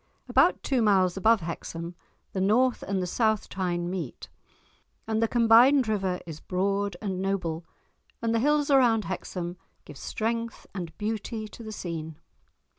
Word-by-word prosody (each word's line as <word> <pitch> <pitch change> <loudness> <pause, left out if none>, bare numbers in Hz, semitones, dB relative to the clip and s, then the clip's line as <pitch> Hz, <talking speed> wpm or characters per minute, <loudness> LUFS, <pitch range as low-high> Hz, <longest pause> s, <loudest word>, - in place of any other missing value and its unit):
About - - +3
two 265 -4 +1
miles 190 -4 +3
above 220 +2 +4
Hexham 170 +1 -5 0.4
the 190 - -1
North 240 +6 +3
and 190 -2 -1
the - - -1
South 220 +3 +1
Tyne 175 -2 -2
meet, 175 -7 -5 0.8
and 220 0 0
the 230 - +3
combined 240 +3 +6
river 195 -4 0
is 160 -3 -8
broad 195 +1 -1
and 190 -3 -2
noble, 175 -4 -2 0.5
and 230 -1 0
the 230 - +2
hills 295 +3 +2
around 240 -6 +4
Hexham 180 -1 -4 0.3
give 145 - -11
strength 230 +1 -3
and 175 -4 -6
beauty 215 +1 -3
to 235 - -12
the 220 -1 -7
scene. 160 -6 -5
200 Hz, 150 wpm, -27 LUFS, 180-225 Hz, 0.8 s, combined